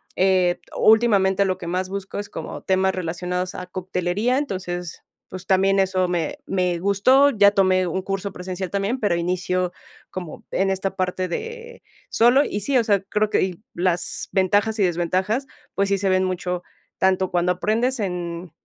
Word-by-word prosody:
eh, 185 -2 +2 0.2
últimamente, 200 -4 +4
lo 185 -1 0
que 170 - -8
más 185 +2 -2
busco 195 0 -5
es 205 - -6
como - - -7
temas 190 0 +1
relacionados 180 +1 -3
a 180 - -5
coctelería. 185 +6 -1
Entonces, 180 - -4 0.3
pues, 185 0 -8
también 195 +1 +3
eso 185 -1 +1
me 170 -3 -2
me 180 -2 0
gustó. 205 +9 +4
Ya 205 -4 +5
tomé 185 -2 +3
un 180 +3 -2
curso 195 +1 -3
presencial 180 0 -5
también, 200 +6 -1
pero 205 -6 +1
inicio 180 +1 -1 0.4
como 180 -4 -8
en 195 0 +1
esta 190 0 -2
parte 185 -1 -1
de 465 - -7 0.3
solo, 245 +5 +5
y 205 - -3
sí, 265 +6 +1
o 240 - +3
sea, 205 -4 +2
creo 210 +2 0
que - - +2
y 185 +1 -4
las 175 0 -1
ventajas, 205 +4 +2
y - - +4
desventajas, 185 +8 0 0.3
pues, 200 0 +1
sí 200 - +2
se 195 0 0
ven 185 0 +3
mucho, 180 -1 -3 0.4
tanto 190 0 +2
cuando 175 0 +2
aprendes, 230 +7 0
en 175 -3 -4
190 Hz, 170 wpm, -22 LUFS, 180-200 Hz, 0.4 s, Ya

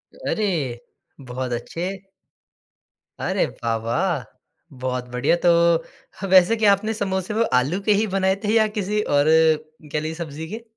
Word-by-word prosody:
अरे, 170 - -2 0.5
बहुत 125 0 -4
अच्छे। 175 +10 -5 1.2
अरे, - - 0
वाह! 115 -1 -3
वाह! 125 +7 -1 0.6
बहुत 125 -1 -3
बढ़िया। 125 +6 +2
तो - - +7 0.7
ह 195 - -2
वैसे 185 +4 +6
क्या 215 -2 +5
आपने 215 +3 -2
समोसे 190 -2 -2
में 225 +2 +2
आलू 135 +9 +2
के - - +5
ही 210 +2 +1
बनाए 190 0 +2
थे 210 +1 +1
या 220 -1 +4
किसी 210 +1 0
और 145 -7 +2 0.7
कह 150 - +1
लीजिए 155 +1 -4
सब्ज़ी 160 -1 -6
के? 225 +4 -7
180 Hz, 150 wpm, -22 LUFS, 130-205 Hz, 1.2 s, तो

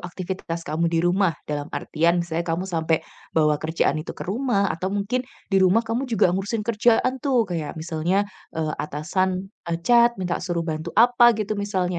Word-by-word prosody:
aktivitas 175 -2 -5
kamu 165 +3 0
di 165 0 0
rumah 180 -2 +2
dalam 145 -1 -4
artian 170 +3 0
misalnya 170 +1 -3
kamu 165 +3 -1
sampai 165 -3 0 0.3
bawa 150 -2 +3
kerjaan 160 -1 0
itu 155 - -8
ke - - -6
rumah 200 0 0
atau 185 +3 -3
mungkin 205 +5 -1 0.3
di 195 - +4
rumah 190 +5 +4
kamu 235 +4 -2
juga 210 -6 +3
ngurusin 205 +4 -2
kerjaan, 235 +3 +3
tuh, 255 -4 +2
kayak 170 -6 -4
misalnya, 170 +5 0 0.3
eee, 155 -1 -1
atasan, 185 +6 -2 0.2
eee, 165 0 -1
chat 235 0 +5
minta 180 -2 -2
suruh 175 -2 -2
bantu 160 0 -4
apa 240 0 +6
gitu 215 -1 -2
misalnya. 190 -4 -1
185 Hz, 175 wpm, -23 LUFS, 165-210 Hz, 0.3 s, apa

